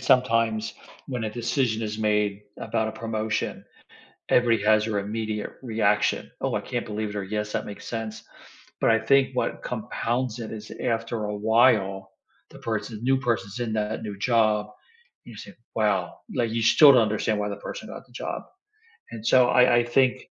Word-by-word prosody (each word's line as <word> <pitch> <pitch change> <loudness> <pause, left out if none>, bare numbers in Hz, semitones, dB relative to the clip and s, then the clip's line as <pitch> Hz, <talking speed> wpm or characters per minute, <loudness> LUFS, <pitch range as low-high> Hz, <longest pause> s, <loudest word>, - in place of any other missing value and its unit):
sometimes 115 -4 +2 0.3
when 125 -4 -3
a 110 - -2
decision 120 -1 -1
is 105 0 -4
made 105 -1 +1 0.2
about 110 0 -1
a - - -5
promotion, 110 -1 -2 0.7
everybody 115 -4 +3
has 110 0 +4
their 110 -2 -1
immediate 105 +1 -3
reaction. 110 -4 +1
"Oh, - - 0
I - - -1
can't - - -4
believe 105 0 -3
it," 105 - -8
or, 100 - -2
"Yes, 105 +1 -3
that - - -2
makes 100 - -9
sense," 110 -1 -5 0.6
but - - +4
I 115 - +5
think 135 +4 +3
what - - -1
compounds 120 0 -2
it 115 - -6
is 110 -1 -8
after 115 -2 -2
a 105 0 -3
while, 105 -3 +2 0.4
the - - -13
person 110 0 -3
the 110 - -11
new 135 +1 +3
person's 115 -3 -2
in 115 -2 -2
that 110 0 -2
new 105 -2 -6
job, 110 -2 +2 0.6
and - - -12
you 105 - -12
say, 100 - -10 0.2
"Wow," 100 -6 0
like, 120 -3 +1
you 115 -1 -1
still 145 +4 +8
don't 125 - +6
understand 110 0 0
why 105 0 -1
the 100 - -5
person - - -8
got - - -9
the - - -22
job. - - -4 0.7
And 110 -2 -8
so 125 +1 +5
I 125 -1 +5
I - - +2
think 125 +1 +2
110 Hz, 185 wpm, -25 LUFS, 105-115 Hz, 0.7 s, still